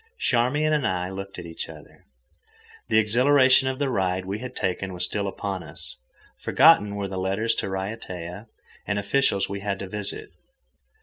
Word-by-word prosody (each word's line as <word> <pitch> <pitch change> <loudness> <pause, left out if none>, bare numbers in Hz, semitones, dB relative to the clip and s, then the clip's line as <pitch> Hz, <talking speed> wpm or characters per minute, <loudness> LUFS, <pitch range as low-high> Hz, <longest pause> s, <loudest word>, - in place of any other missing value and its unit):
Charmian 145 - +2
and 145 -5 +2
I 90 -1 -2
looked 95 +1 -7
at - - -7
each 80 -1 -7
other. - - -14 0.8
The 110 - +2
exhilaration 130 +4 +5
of 130 0 -1
the 140 -1 0
ride 95 -3 0
we 100 +3 -3
had 125 +1 -7
taken 95 +1 -2
was 90 0 +1
still 100 +3 -2
upon 95 -1 -4
us. 65 - -10 0.4
Forgotten 100 0 +5
were 100 -1 -2
the 95 -1 -4
letters 100 +5 0
to - - -1
Raiatea, 95 -1 -5 0.4
the 100 - 0
officials 100 -1 +1
we 100 0 -4
had 100 0 -2
to 95 - -6
visit. 105 +1 -3
100 Hz, 170 wpm, -25 LUFS, 95-120 Hz, 0.8 s, exhilaration